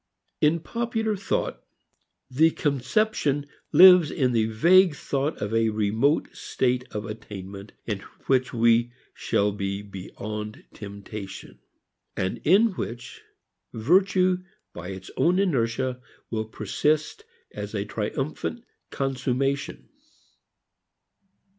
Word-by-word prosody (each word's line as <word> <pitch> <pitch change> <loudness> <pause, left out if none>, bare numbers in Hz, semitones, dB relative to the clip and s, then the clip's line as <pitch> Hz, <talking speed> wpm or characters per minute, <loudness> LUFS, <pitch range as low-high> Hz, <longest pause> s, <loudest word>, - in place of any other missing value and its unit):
In 155 +2 +3
popular 225 0 -2
thought, 200 - -2 0.6
the 155 +6 +4
conception 145 - 0 0.3
lives 180 0 +8
in 130 -3 +1
the 115 -2 +2
vague 170 - +5
thought 140 +2 -2
of 105 +1 -3
a 115 0 +3
remote 110 +7 +1
state 125 -1 -1
of 105 0 -4
attainment 100 -2 -8
in 105 -4 -2 0.3
which 130 -1 +2
we 115 0 +3 0.2
shall 100 +1 0
be 100 0 -3
beyond 105 +2 -7
"temptation," 100 -1 -9 0.6
and 95 0 -2
in 205 +7 +5
which 120 -9 -7 0.5
virtue 185 - +3 0.3
by 85 0 -8
its 95 0 -8
own 175 +2 +3
inertia 130 -7 0 0.3
will 110 -1 -1
persist 150 - -1 0.3
as - - -6
a - - -1
triumphant 240 -1 -3 0.3
consummation. 135 +1 -2
125 Hz, 105 wpm, -25 LUFS, 105-165 Hz, 0.6 s, lives